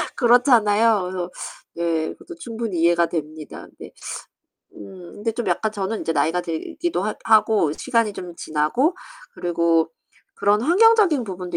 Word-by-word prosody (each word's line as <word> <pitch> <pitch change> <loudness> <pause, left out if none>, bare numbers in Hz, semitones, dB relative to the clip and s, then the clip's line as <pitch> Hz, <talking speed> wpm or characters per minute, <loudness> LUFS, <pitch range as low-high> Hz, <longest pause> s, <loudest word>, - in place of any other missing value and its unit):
그렇잖아요. 230 -4 +4
그래서 180 -1 -4 0.4
네, 165 -2 -1
그것도 350 - -12
충분히 225 -6 -4
이해가 170 0 +3
됩니다. 155 -2 -6
네. - - -10 0.8
음 170 - -12
근데 220 +2 -2
좀 235 0 -4
약간 210 +5 0
저는 205 +1 -3
이제 165 - -2
나이가 160 +4 +1
들기도 295 - -3
하 210 +2 -2
하고 215 -7 +3
시간이 230 +2 0
좀 180 -3 -8
지나고 155 - 0 0.4
그리고 170 -1 +1 0.4
그런 205 +2 +2
환경적인 370 - +4
부분도 185 -3 -5
200 Hz, 310 characters per minute, -22 LUFS, 170-230 Hz, 0.8 s, 그렇잖아요